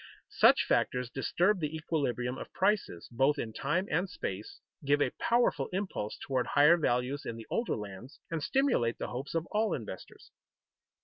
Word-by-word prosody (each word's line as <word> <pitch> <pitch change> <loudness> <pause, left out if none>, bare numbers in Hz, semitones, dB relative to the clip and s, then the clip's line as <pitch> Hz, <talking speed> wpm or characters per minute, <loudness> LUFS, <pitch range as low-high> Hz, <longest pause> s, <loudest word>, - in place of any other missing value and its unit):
Such - - +5
factors 125 -1 0
disturb 180 +9 +1
the 155 -1 -2
equilibrium 135 -6 -1
of - - -8
prices 195 - 0
both 135 +5 +2
in 110 -5 -4
time 170 - -1
and 175 +5 +1
space, 395 +4 -6 0.2
give 145 +1 +3
a - - +2
powerful 240 +1 +2
impulse 185 - -3
toward 130 -2 -1
higher 150 +4 +6
values 130 -2 0
in 115 - -5
the 115 -1 -9
older 230 - 0
lands, 105 +6 -9
and 165 -2 -2
stimulate 195 - +1
the - - -4
hopes 130 +6 -5
of 165 0 0
all 215 0 +1
investors. 105 -6 -9
145 Hz, 165 wpm, -31 LUFS, 125-185 Hz, 0.2 s, higher